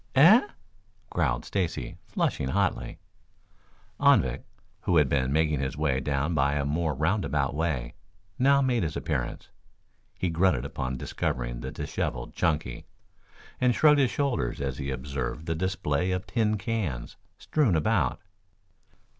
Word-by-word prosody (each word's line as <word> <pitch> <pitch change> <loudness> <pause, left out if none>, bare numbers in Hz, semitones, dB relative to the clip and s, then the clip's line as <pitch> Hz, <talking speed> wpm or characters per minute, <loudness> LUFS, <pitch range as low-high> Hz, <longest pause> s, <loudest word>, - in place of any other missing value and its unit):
"Eh?" 175 - +8 0.7
growled 70 -8 0
Stacy, 90 -5 -2
flushing 65 - -1
hotly. - - -1 1.0
Anvik, - - +4 0.4
who 90 - +1
had 75 -3 +5
been 65 -1 +1
making 75 -1 +2
his 65 0 -3
way 70 -4 +1
down 70 +4 -1
by 70 -1 +2
a 70 -1 0
more 75 +1 0
roundabout 75 -3 0
way, 75 -6 -2 0.5
now 140 +2 +5
made 125 -3 +1
his 80 -3 -2
appearance. 65 -6 -3 0.7
He 90 - -1
grunted 80 -7 +2
upon 65 0 -3
discovering - - -3
the 65 +2 -5
disheveled - - -4
Chunky, 75 -7 -1 0.7
and 125 -2 +3
shrugged 150 -2 +5
his 135 -3 +4
shoulders 125 - -1
as 70 -2 -3
he 70 -1 -3
observed 70 +2 -4
the 80 - -1
display 90 -1 -1
of 90 0 -2
tin 110 -3 +1
cans 95 - -3 0.2
strewn 140 - +1
about. 80 - +1
75 Hz, 135 wpm, -27 LUFS, 65-95 Hz, 1.0 s, Eh